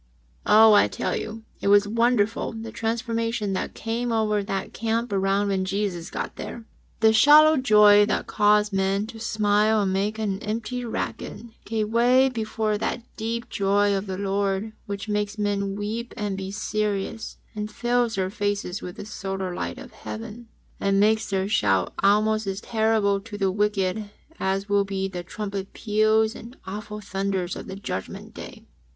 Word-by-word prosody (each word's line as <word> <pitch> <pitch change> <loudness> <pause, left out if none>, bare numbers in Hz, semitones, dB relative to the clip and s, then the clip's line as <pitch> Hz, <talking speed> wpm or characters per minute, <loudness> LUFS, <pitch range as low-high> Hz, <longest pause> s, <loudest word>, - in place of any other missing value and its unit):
Oh, 220 +1 +7
I 205 - +6
tell 95 - -2
you, 225 +1 -5 0.2
it - - -2
was 205 0 +5
wonderful 230 0 +1
the 225 0 -7
transformation 230 -2 -2
that 185 - -3
came 235 +2 -2
over 215 -2 +1
that 195 -1 -4
camp 230 +1 -1
ground 195 +1 +1
when 190 -1 0
Jesus 190 -2 -2
got - - -5
there - - -5
1 - - -20 0.4
The 220 0 +6
shallow 300 +7 +7
joy 210 -4 +6
that - - -1
caused 210 0 +3
men 195 +1 +1
to 225 0 -10
smile 215 0 +2
and 190 -1 0
make 205 +3 -1
an 200 -3 -2
empty 225 +3 -3
racket, 230 0 -4 0.2
gave 215 -1 -1
way 250 +3 +4
before 220 -3 -2
that 235 - -2
deep 230 +1 -3
joy 200 +1 +2
of 195 +1 -3
the 190 -1 -4
Lord 200 +1 -1
which 200 +1 -5
makes 210 0 -1
men 200 -1 -1
weep 220 +4 -4
and 205 -3 -2
be 190 0 -5
serious 210 +1 -3 0.2
and 210 0 -3
fills 240 0 0
their 190 -1 -1
faces 205 -2 -2
with 180 - -7
the 205 - -8
solar 195 -3 -4
light 175 - -4
of 265 -1 -10
Heaven, 225 +1 -8 0.3
and 195 0 +2
makes 220 +2 +3
their 190 -1 0
shout 95 - +1
almost 215 +1 +3
as 195 0 -2
terrible 220 -3 +1
to 205 +1 -9
the 195 -2 +1
wicked 205 0 0 0.3
as 195 +1 -1
will 205 -1 +3
be 195 -1 -2
the 180 -2 -5
trumpet 195 +1 -5
peals 215 0 +2
and 240 +3 -11
awful 210 +2 -6
thunders 195 -2 -2
of - - -8
the 190 - -6
Judgment 145 - -6
Day. - - -10
210 Hz, 170 wpm, -25 LUFS, 195-220 Hz, 0.4 s, Oh